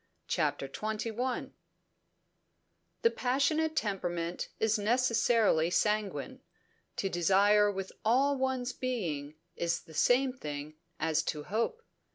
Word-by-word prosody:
CHAPTER 135 - 0
XXI 220 - -3 1.5
The 460 - +5
passionate 310 +5 +1
temperament 175 - -2
is 220 0 +2
necessarily 230 -6 +3
sanguine. 215 +7 -1 0.5
To 195 - -1
desire 200 +4 +4
with 195 -1 -5
all 265 +6 +3
one's 260 -1 -1
being 165 - -3 0.2
is 170 0 -1
the 160 - -15
same 255 - +3
thing 150 - -6 0.3
as 160 0 +1
to 150 -1 -3
hope. 230 - -2
215 Hz, 105 wpm, -31 LUFS, 175-255 Hz, 1.5 s, The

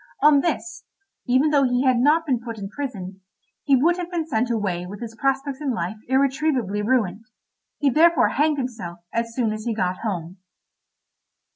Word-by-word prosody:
On 295 -1 +7
this, 345 +2 -3 0.4
even 260 +5 +3
though 285 -2 +4
he 250 0 +1
had 255 -2 +3
not 305 +6 +3
been 260 -6 +1
put 230 -1 -7
in 195 -2 -6
prison, 195 -9 -6 0.4
he 280 - +3
would 330 +7 +3
have 355 -1 -4
been 340 -3 -2
sent 245 -5 0
away 200 -6 -1
with 200 +2 -8
his 230 -2 -7
prospects 270 +3 -1
in 270 -5 -1
life 180 +4 -3
irretrievably 265 -5 +1
ruined; 215 -3 0 0.5
he 285 -2 +2
therefore 325 +1 +4
hanged 300 +1 +1
himself 225 -10 -5 0.2
as 230 0 -2
soon 230 -4 0
as 215 +1 -7
he 230 -2 -1
got 185 -3 -1
home. 185 -4 -4
250 Hz, 175 wpm, -23 LUFS, 215-285 Hz, 0.5 s, On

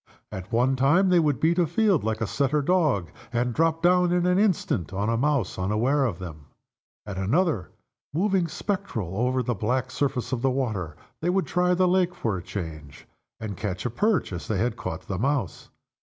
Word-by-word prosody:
At 95 -1 -7
one 125 +3 +2
time 155 +9 +4
they 180 -1 +5
would 150 -4 +1
beat 170 +3 +2
a 170 - +3
field 190 - +2
like 110 0 -2
a - - +2
setter 140 +6 0
dog, 145 - +1 0.2
and 120 0 0
drop 165 +3 +1
down 180 0 +4
in 175 0 +2
an 180 +1 +3
instant 180 - +1
on 100 +3 -1
a 115 - +1
mouse 135 -7 0
unaware 115 +9 +1
of 105 -9 -2
them. 80 -5 -9 0.6
At 100 -2 -5
another 140 - +1
time - - -26 0.4
moving 185 +2 +1
spectral 165 - -3
over 125 +3 +1
the 120 - 0
black 125 +5 -1
surface 125 -4 -1
of 125 -3 -1
the 135 - +2
water 110 - -2 0.3
they 170 - 0
would 190 +1 +1
try 180 0 +2
the 185 0 +3
lake 180 -1 +2
for 110 - -1
a 90 - -4
change, 80 -6 -7 0.3
and 110 -3 -5
catch 95 0 -4
a 120 - -1
perch 205 - +1
as 85 - -6
they 110 - 0
had 120 +6 0
caught 80 - -5
the 95 -2 -3
mouse. 130 - -1
130 Hz, 200 wpm, -25 LUFS, -, 0.6 s, they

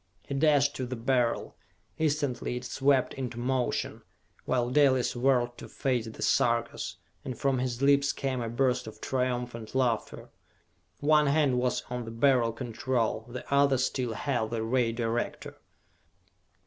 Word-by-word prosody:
He - - -4
dashed 145 0 +3
to 130 - -3
the 130 - -4
Beryl. 120 0 0 0.4
Instantly 145 -5 0
it 125 - -7
swept 135 0 +2
into 125 -3 -5
motion, 125 0 -1 0.4
while 125 -1 0
Dalis 130 -3 +3
whirled 120 -1 +1
to - - -9
face 125 -4 -1
the 110 - -7
Sarkas, - - +1 0.3
and 130 -3 -5
from 135 -2 +1
his 125 0 -2
lips 140 0 +4
came 130 -2 -2
a 115 - -3
burst 125 0 0
of 110 - -10
triumphant 125 -3 -3
laughter. 120 -4 -1 0.7
One 150 0 +4
hand 140 -3 +3
was 125 0 0
on 125 -1 -3
the - - -6
Beryl 115 0 +3
Control, 115 -1 -2
the 120 0 -7
other 140 -1 +4
still 125 -2 -1
held 120 -2 -1
the 115 -1 -2
Ray 120 0 +1
Director. 115 0 -3
125 Hz, 150 wpm, -29 LUFS, 120-135 Hz, 0.7 s, lips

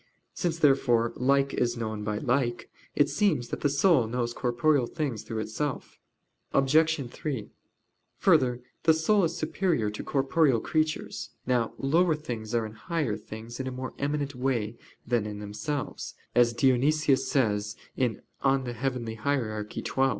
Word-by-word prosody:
Since, 170 -3 -1
therefore, 120 -6 +3
like 140 +2 +2
is 120 0 0
known 110 -2 -3
by 105 0 -1
like, 125 -1 -1 0.2
it 145 - +4
seems 155 - +1
that - - -4
the 145 - +3
soul 140 -3 +4
knows 120 0 -2
corporeal 125 +2 +2
things 135 -9 -3
through 110 0 -4
itself. 130 +6 -4 0.6
Obj. 150 +1 +3
3: 130 -9 -4 0.7
Further, 125 -1 +3 0.2
the 160 -1 +5
soul 190 +4 +3
is 165 0 -3
superior 155 - 0
to 105 - -6
corporeal 135 -2 +2
creatures. 155 +5 -1 0.2
Now 120 -2 +1
lower 160 +4 +3
things 120 -7 -5
are 115 -1 +1
in 110 - -7
higher 130 0 -2
things 110 +3 -9
in 130 - -3
a - - -2
more 130 0 -5
eminent 145 0 -1
way 125 -4 -1 0.3
than 115 -3 0
in 105 -1 -5
themselves, 105 +8 -4 0.2
as 120 -1 +4
Dionysius 135 +2 +3
says 105 -5 +1 0.7
(Coel. 135 -1 +2
Hier. 120 -2 -2
xii). - - -5
130 Hz, 145 wpm, -28 LUFS, 115-145 Hz, 0.7 s, the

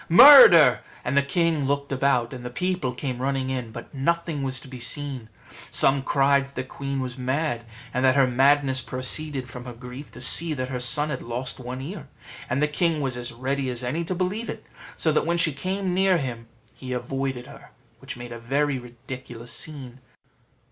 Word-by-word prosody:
murder!" 175 - +9 0.3
and 125 - -1
the 140 - +5
king 160 +1 0
looked 140 0 -2
about, 130 -2 +1
and 125 -1 -8
the 125 - -5
people 180 0 -2
came 125 0 -5
running 135 -1 -1
in; 125 -4 -4
but - - -10
nothing 165 +2 -1
was 130 -1 -3
to - - -14
be 130 -1 -9
seen. 130 -1 -3 0.4
Some 135 0 +4
cried 140 0 +2
that 140 - -22
the 130 - -3
queen 135 +1 -5
was 130 0 -6
mad, 130 -2 -2 0.3
and 125 - 0
that 130 0 +4
her 135 -1 +5
madness 135 +1 +2
proceeded 130 +2 -2
from 125 0 -9
her 125 - -7
grief 125 +4 -10
to 120 - -10
see 155 +5 +5
that 130 -1 -4
her 130 -2 -3
son 145 +5 +1
had 135 - -4
lost 125 +3 -3
one 125 +1 -6
ear; 155 +1 -7 0.4
and 140 +4 0
the - - +3
king 160 +1 0
was 135 -3 -2
as 120 0 -4
ready 130 +3 -2
as 125 0 -3
any 145 +8 -2
to 185 - -3
believe 190 +6 -2
it, - - -7 0.3
so 160 - +1
that 155 - +2
when 170 0 +1
she 165 -3 +1
came 185 +5 -2
near 190 0 +3
him 120 -6 -5 0.3
he 130 -1 -7
avoided 130 0 -3
her, - - -14 0.3
which - - -7
made 120 0 -9
a 120 - -7
very 135 +3 0
ridiculous 120 -1 -9
scene. 135 -5 -6
135 Hz, 200 wpm, -24 LUFS, 125-150 Hz, 0.4 s, murder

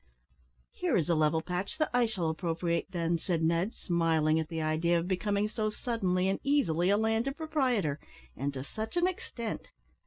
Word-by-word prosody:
"Here 180 - 0
is 175 -1 0
a - - +4
level 155 0 +2
patch 180 - -3
that 310 -1 0
I 245 -1 +4
shall 180 -7 -1
appropriate, 170 +1 -1
then," 170 -2 0
said 165 -2 -1
Ned, 170 +6 +1
smiling 160 -3 +2
at 160 - -2
the 165 - -3
idea 160 +2 +2
of 170 +1 -1
becoming 200 +2 0
so 215 0 -1
suddenly 190 -5 0
and 195 - 0
easily 185 - +2
a 200 - +4
landed 225 +5 0
proprietor 255 - 0 0.4
and 140 +2 -2
to 130 - -4
such 220 - -5
an 345 - +4
extent. 240 -11 -4
180 Hz, 180 wpm, -30 LUFS, 165-220 Hz, 0.4 s, a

